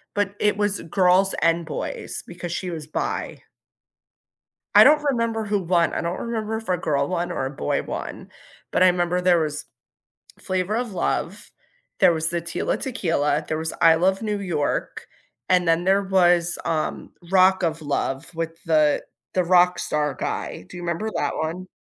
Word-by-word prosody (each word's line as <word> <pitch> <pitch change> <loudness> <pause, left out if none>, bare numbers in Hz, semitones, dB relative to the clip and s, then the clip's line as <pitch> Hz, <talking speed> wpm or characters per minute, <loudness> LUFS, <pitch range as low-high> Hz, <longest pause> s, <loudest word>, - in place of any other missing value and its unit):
but 205 -1 0
it 210 -1 +2
was 205 -1 0
girls 185 +2 +3
and 165 0 +2
boys, 155 - -5
because 175 -1 -7
she 180 +1 -3
was 160 -3 -6
bi. 155 - -3 1.4
I - - +10
don't 300 0 +5
remember 230 -5 0
who 205 0 0
won. 175 -2 +1
I - - -1
don't 170 +2 -3
remember 220 -2 -3
if 225 -3 -9
a 180 - +2
girl 140 -4 0
won, 175 -1 -2
or 135 - -2
a - - -2
boy 135 - -2
won, - - -6 0.4
but - - +3
I 185 - +7
'member 180 0 0
there 180 -1 +4
was 150 -2 -3 0.8
Flavor 185 +3 -1
of 240 -2 -2
Love, 185 +2 -2 0.5
there 185 -3 +6
was 160 -1 -1
the 170 0 -2
Tila 170 +1 -2
Tequila, 165 - 0
there 155 - -1
was 160 0 -3
I 165 - +7
Love 190 +4 +1
New 210 -2 -1
York, 170 -7 -2 0.4
and 180 -1 +3
then 165 +1 +2
there 195 +2 +3
was, 175 -3 +3
um, 155 -2 -2 0.2
Rock 190 0 +5
of 165 -2 -1
Love 140 +2 -3
with 165 0 -5
the 155 -2 +2 0.3
the 185 - +3
rockstar 175 -5 +2
guy. - - -4
Do - - -11
you 175 - -7
remember 175 +6 -2
that - - -1
one? 170 +4 -4
175 Hz, 175 wpm, -23 LUFS, 165-195 Hz, 1.4 s, I